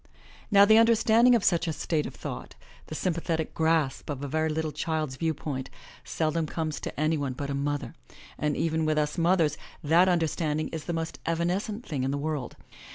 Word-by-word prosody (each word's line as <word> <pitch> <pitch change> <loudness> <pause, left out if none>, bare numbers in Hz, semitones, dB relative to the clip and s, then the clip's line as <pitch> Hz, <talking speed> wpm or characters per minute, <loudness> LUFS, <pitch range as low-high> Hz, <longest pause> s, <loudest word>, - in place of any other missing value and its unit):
Now 200 -2 +7
the 220 +2 +7
understanding 230 +1 +5
of 225 - +1
such 175 -1 +2
a 160 - -1
state 155 +1 -1
of - - -10
thought, - - -7 0.3
the 155 - -6
sympa 170 0 -1
thetic 160 -2 -2
grasp 160 -4 +1
of 145 -1 -4
a - - -2
very 155 +3 0
little 155 0 -2
child's 155 -2 -2
viewpoint, 145 -3 -3 0.3
seldom 160 0 -1
comes 155 -1 -3
to - - -6
any 155 0 +1
one 140 -2 -2
but 140 +2 -4
a - - -1
mother, 145 +1 -2 0.4
and 150 -1 -1
even 160 -1 0
with 155 0 +1
us 150 +3 0
mothers 165 -3 +2 0.2
that 170 +5 +5
understanding 160 -3 0
is 160 -2 -6
the - - -3
most 165 0 -4
evanescent 185 +7 -1
thing 145 -4 -3
in 130 - 0
the 140 - -1
world. 145 -3 -3
160 Hz, 195 wpm, -27 LUFS, 150-170 Hz, 0.4 s, Now